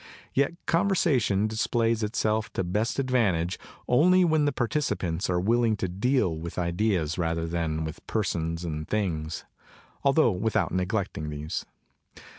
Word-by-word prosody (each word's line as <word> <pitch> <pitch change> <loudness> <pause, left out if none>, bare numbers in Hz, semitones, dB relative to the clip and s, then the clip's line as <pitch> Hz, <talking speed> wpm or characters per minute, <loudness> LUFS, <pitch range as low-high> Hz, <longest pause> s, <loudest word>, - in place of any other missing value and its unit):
Yet 140 +4 +2
conversation 160 - +2
displays 115 +1 0
it 105 +2 -2
self 110 0 0
to - - -1
best 105 +6 -1
advantage 105 -11 +1 0.3
only 180 +8 +5
when 155 -3 +3
the 145 - +2
participants 110 - -1
are 90 -1 +2
willing 115 +3 +2
to 95 - -1
deal 100 0 +1
with 80 +1 -7
ideas, 90 -2 0
rather 85 -1 0
than 80 -2 -2
with 80 +1 -8
persons 85 -5 -1
and 75 -1 -4
things, 85 -7 -2 0.6
altho 140 -2 +4
without 105 +3 0
neglecting 90 -4 -2
these. 75 +1 -4
100 Hz, 135 wpm, -27 LUFS, 85-120 Hz, 0.6 s, only